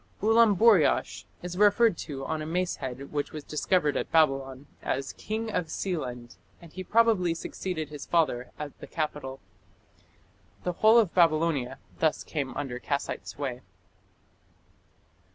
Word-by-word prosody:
Ulamburiash 220 Hz, -5 st, +4 dB, 0.2 s
is 180 Hz, +1 st, -5 dB
referred 210 Hz, 0 st, +5 dB
to 135 Hz, -3 st, -5 dB
on 155 Hz, -, -2 dB
a -, -, -4 dB
mace 180 Hz, +2 st, -1 dB
head 130 Hz, 0 st, -6 dB
which 145 Hz, -1 st, -2 dB
was 155 Hz, -2 st, -7 dB
discovered 150 Hz, 0 st, +1 dB
at -, -, -2 dB
Babylon 135 Hz, -4 st, +2 dB, 0.2 s
as 135 Hz, 0 st, -2 dB
"king 220 Hz, +1 st, -4 dB
of 180 Hz, -5 st, -1 dB
Sealand", 125 Hz, -9 st, -4 dB, 0.2 s
and 170 Hz, -2 st, -15 dB
he 185 Hz, -, -6 dB
probably 210 Hz, -5 st, +3 dB
succeeded 165 Hz, -2 st, -4 dB
his 150 Hz, -2 st, -8 dB
father 140 Hz, -7 st, +1 dB
at 150 Hz, -2 st, -6 dB
the -, -, -9 dB
capital. 150 Hz, -4 st, -4 dB, 1.2 s
The 180 Hz, -, -1 dB
whole 220 Hz, +6 st, +5 dB
of 215 Hz, -7 st, +3 dB
Babylonia 155 Hz, -6 st, +2 dB, 0.2 s
thus 160 Hz, -1 st, +1 dB
came 140 Hz, -5 st, -4 dB
under 135 Hz, -4 st, -4 dB
Kassite 140 Hz, +2 st, -3 dB
sway. 130 Hz, -3 st, -5 dB
155 Hz, 135 wpm, -28 LUFS, 140-185 Hz, 1.2 s, referred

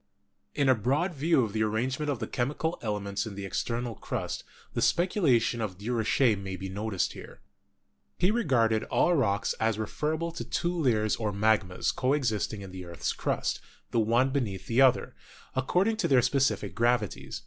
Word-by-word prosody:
In 140 Hz, -2 st, +2 dB
a 130 Hz, -, +7 dB
broad 140 Hz, -, 0 dB
view 150 Hz, -2 st, +2 dB
of 105 Hz, -3 st, -3 dB
the 110 Hz, -, 0 dB
arrangement 130 Hz, +7 st, 0 dB
of 140 Hz, -, 0 dB
the 110 Hz, -, -3 dB
chemical 145 Hz, +8 st, -2 dB
elements 105 Hz, -1 st, -2 dB
in 105 Hz, -, -7 dB
the 100 Hz, 0 st, -5 dB
external 120 Hz, +4 st, -2 dB
crust, -, -, -4 dB, 0.3 s
the -, -, -1 dB
speculation 140 Hz, -, +2 dB
of 95 Hz, -5 st, -3 dB
Durocher 115 Hz, +2 st, +2 dB
may 95 Hz, -1 st, -5 dB
be 95 Hz, 0 st, -6 dB
noticed 100 Hz, 0 st, -2 dB
here. -, -, -11 dB, 0.8 s
He 185 Hz, -, +3 dB
regarded 120 Hz, -, +2 dB
all 175 Hz, -, +2 dB
rocks 100 Hz, -, +1 dB
as 110 Hz, -1 st, +1 dB
referable 155 Hz, +9 st, -2 dB
to 165 Hz, -, -5 dB
two 175 Hz, +1 st, -1 dB
layers 110 Hz, -, +1 dB
or 110 Hz, -2 st, -1 dB
magmas 100 Hz, -3 st, +1 dB
co 130 Hz, +1 st, +1 dB
existing 110 Hz, -6 st, -1 dB
in 95 Hz, -, -9 dB
the 95 Hz, 0 st, -7 dB
earth's 85 Hz, -1 st, -3 dB
crust, -, -, -2 dB, 0.3 s
the 115 Hz, -, +2 dB
one 120 Hz, +4 st, +3 dB
beneath 105 Hz, -9 st, -2 dB
the 120 Hz, +3 st, +2 dB
other, 130 Hz, -2 st, +4 dB, 0.4 s
according 180 Hz, -, +1 dB
to 225 Hz, -, +1 dB
their 130 Hz, -3 st, +4 dB
specific 135 Hz, +2 st, +1 dB
gravi 120 Hz, -2 st, +2 dB
ties. -, -, -8 dB
120 Hz, 175 wpm, -28 LUFS, 105-140 Hz, 0.8 s, a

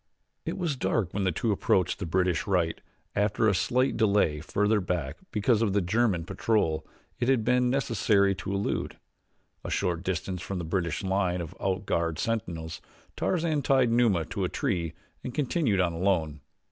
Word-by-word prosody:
It -, -, -2 dB
was 170 Hz, -6 st, -1 dB
dark 110 Hz, -7 st, -1 dB
when 100 Hz, -1 st, -1 dB
the 95 Hz, -, +2 dB
two 110 Hz, +7 st, -1 dB
approached 95 Hz, -2 st, +1 dB
the 95 Hz, -, -3 dB
British 90 Hz, +1 st, +1 dB
right, 90 Hz, -4 st, +1 dB, 0.3 s
after 105 Hz, +2 st, +2 dB
a 105 Hz, -, +4 dB
slight 125 Hz, +7 st, +1 dB
delay 100 Hz, -9 st, +3 dB
farther 105 Hz, +7 st, +1 dB
back 85 Hz, -7 st, -2 dB
because 110 Hz, +2 st, +2 dB
of 105 Hz, -4 st, +1 dB
a -, -, +5 dB
German 95 Hz, -2 st, +1 dB
patrol 95 Hz, -4 st, 0 dB, 0.3 s
it 120 Hz, -, 0 dB
had 130 Hz, -4 st, +3 dB
been 125 Hz, +1 st, +3 dB
necessary 110 Hz, -6 st, +2 dB
to 95 Hz, -, -5 dB
elude. 100 Hz, +1 st, -2 dB, 0.7 s
A -, -, -5 dB
short 90 Hz, -3 st, 0 dB
distance 90 Hz, 0 st, -3 dB
from 95 Hz, -, -4 dB
the 85 Hz, -, -3 dB
British 85 Hz, 0 st, -1 dB
line 95 Hz, -2 st, 0 dB
of 85 Hz, 0 st, -6 dB
out 95 Hz, 0 st, -1 dB
guard 85 Hz, -3 st, 0 dB
sentinels 85 Hz, -8 st, -3 dB, 0.3 s
Tarzan 160 Hz, -4 st, 0 dB
tied 130 Hz, -3 st, +3 dB
Numa 115 Hz, -9 st, +3 dB
to -, -, -3 dB
a -, -, 0 dB
tree 85 Hz, -2 st, -1 dB, 0.3 s
and 125 Hz, -, -6 dB
continued 135 Hz, -, +1 dB
on 90 Hz, -2 st, +2 dB
alone. 80 Hz, -5 st, 0 dB
100 Hz, 170 wpm, -28 LUFS, 85-115 Hz, 0.7 s, a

